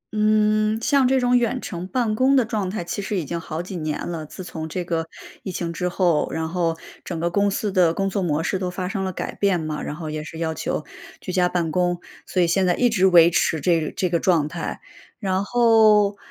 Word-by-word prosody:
嗯， 215 0 +2
像 275 +1 +3
这 265 0 +2
种 245 0 +4
远 245 +1 0
程 180 -2 -6
办 230 -1 0
公 260 +4 +3
的 260 - +5
状 215 -4 -2
态 190 -2 -3
其 175 +4 -4
实 205 +1 -3
已 175 - -1
经 170 +3 -4
好 160 0 -5
几 185 +1 -7
年 155 -2 -3
了， 165 -2 -4
自 185 - -9
从 160 -3 -6
这 180 +3 -3
个 165 -1 -2 0.4
疫 190 - -5
情 170 -1 -3
之 180 +1 -2
后， 175 -3 +1
然 160 0 -2
后 165 -2 -1 0.3
整 175 - -4
个 170 +1 0
公 200 +3 +2
司 205 +1 -2
的 180 -4 +3
工 195 +3 -1
作 195 +1 -2
模 160 -3 0
式 190 +2 -1
都 185 -1 -2
发 180 0 -4
生 195 -2 -2
了 185 - -3
改 - - -4
变 195 -4 +1
嘛， 155 -1 -4
然 150 - -5
后 155 0 -6
也 155 0 -4
是 160 - -9
要 160 -1 -2
求 245 +10 -3 0.4
居 185 - -5
家 180 -1 +2
办 175 -3 -1
公， 175 +1 0 0.2
所 180 - +1
以 - - +2
现 185 +2 +2
在 175 - +3
一 245 - +3
直 200 -5 +2
维 170 -2 +7
持 160 -2 +1
这 165 -2 +1
这 185 - 0
个 170 0 +1
状 165 -5 +2
态。 165 +1 -5 0.4
然 190 -2 -1
后， 215 -3 +4
180 Hz, 260 characters per minute, -22 LUFS, 170-210 Hz, 0.4 s, 维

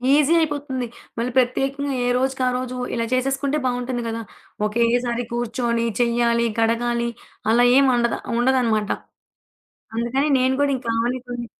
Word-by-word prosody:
Easy 300 +2 +4
అయిపోతుంది. 285 -5 -2 0.3
మళ్ళీ 235 +2 -1
ప్రత్యేకంగా 270 +3 +1
ఏ 245 - +1
రోజుకి 265 +1 -1
ఆ - - +3
రోజు 255 0 -4 0.2
ఇలా 230 -1 0
చేసేసుకుంటే 270 +3 0
బావుంటుంది 245 0 -1
గదా! 230 0 -3 0.4
ఒకేసారి 235 +2 +1
కూర్చొని 235 0 -1 0.2
చెయ్యాలి, 235 0 +2
కడగాలి 235 +1 +1 0.4
అలా 240 +2 +5
ఏం 275 0 +5
అండద 235 -1 +1 0.2
ఉండదనమాట. 240 -4 +2 1.1
అందుకని 240 +6 0
నేను 260 +1 +2
కూడా 285 -1 +2
ఇంక 250 -2 -11
ఆమెనే 240 +3 0
కొన్ని 245 -1 -5
245 Hz, 135 wpm, -22 LUFS, 235-265 Hz, 1.1 s, అలా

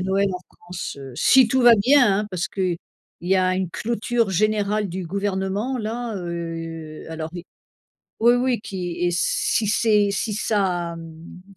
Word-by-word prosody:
Noël 195 +2 +1
en - - -3 0.2
France, 175 -4 -7
heu, 135 -2 -9
si 255 - +5
tout 260 +1 +2
va 240 - +8
bien, 245 0 +4
hein! 210 - -2
Parce 180 -2 -2
qu'il 185 -3 -2 0.5
y 185 +2 +2
a 185 0 +2
une 185 -2 -2
clôture 230 +2 -1
générale 210 +2 +1
du 180 0 -5
gouvernement, 200 +6 -2
là, 230 +1 -4
heu, 165 -3 -6
alors 160 0 -5
i 175 0 -7 0.8
oui, 235 +2 +6
oui, 250 -1 +1
qui 180 -4 -5
et 175 - +2
si 175 +5 0
c'est 210 -1 +3
si 200 +2 -2
ça, 185 -5 -1
mmh 165 +2 -11
195 Hz, 160 wpm, -23 LUFS, 175-215 Hz, 0.8 s, va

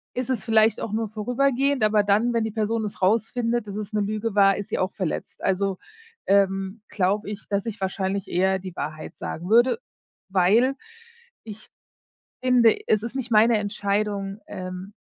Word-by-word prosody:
ist 250 0 -3
es 235 -6 -1
vielleicht 220 -1 +4
auch 215 - -4
nur 220 0 -1
vorübergehend, 255 +4 0
aber 215 -1 +4
dann, 215 +4 +2
wenn 230 -1 +1
die 220 - -2
Person 220 +1 -1
es 205 - -7
rausfindet, 230 +3 +1
dass 200 - -6
es 210 -1 -5
'ne 210 - +1
Lüge 215 +1 -2
war, 195 -1 +5
ist 205 - -6
sie - - -1
auch 185 +1 -1
verletzt. 185 -6 -4
Also, 195 0 0 0.5
ähm, 195 +1 +1
glaube 205 +2 0
ich, 210 - -8
dass 200 0 -1
ich 220 -3 -5
wahrscheinlich 190 +1 -2
eher 190 +2 +1
die 185 -2 -9
Wahrheit 155 +1 -6
sagen 175 +4 -6
würde, 240 - +4 0.5
weil 205 +8 +3 0.7
ich 215 -1 -10 0.8
finde, 245 -3 +5
es 215 -1 +3
ist 235 +3 -5
nicht 260 -2 -4
meine 225 +1 +5
Entscheidung 205 -1 -2
ähm, 185 +1 -7
210 Hz, 170 wpm, -24 LUFS, 195-230 Hz, 0.8 s, war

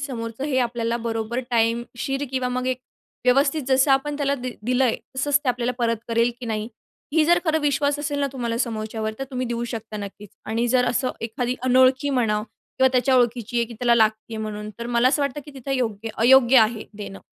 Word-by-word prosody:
समोरचं 235 -2 -5
हे 280 -3 0
आपल्याला 235 -1 0
बरोबर 230 +1 -2
टाइमशीर 240 +4 0
किंवा 260 -1 -1
मग 250 0 -2
एक 255 -1 0 0.5
व्यवस्थित 275 +4 +3
जसं 265 +2 +4
आपण 280 +2 +2
त्याला 280 -1 +1
दिलं 250 +1 0
आहे 240 - +2 0.2
तसंच 280 +2 +2
ते - - 0
आपल्याला 245 0 0
परत 230 -1 +1
करेल 230 +1 +2
की 245 - -6
नाही? 220 0 -2 0.4
ही 315 -1 +4
जर 345 +2 +4
खरं 315 -2 +2
विश्वास 290 0 +1
असेल 290 -1 -2
ना, 280 - +1
तुम्हाला 235 -3 -2
समोरच्यावर 220 -2 -2
तर 270 - -3
तुम्ही 255 -1 -2
देऊ 235 0 -2
शकता 220 -1 -6
नक्कीच 205 0 -8 0.2
आणि 225 +2 0
जर 250 0 +3
असं 250 +1 0
एखादी 240 +2 -2
अनोळखी 260 +2 +4
म्हणा 225 -5 +1 0.4
किंवा 260 - +6
त्याच्या 260 +1 +3
ओळखीची 240 -1 +1
आहे 235 - +3
की 235 - -10
त्याला 240 +1 +3
लागती 220 0 +1
आहे 220 - -4
म्हणून, 210 0 -5
तर 235 - -5
मला 240 +1 +3
असं 290 +2 +1
वाटतं 280 +1 -2
की - - -9
तिथं 270 0 -7
योग्य 225 -4 -2
अयोग्य 255 +2 +6
आहे 220 0 +2
देणं. 200 -2 -7
245 Hz, 205 wpm, -23 LUFS, 230-265 Hz, 0.5 s, किंवा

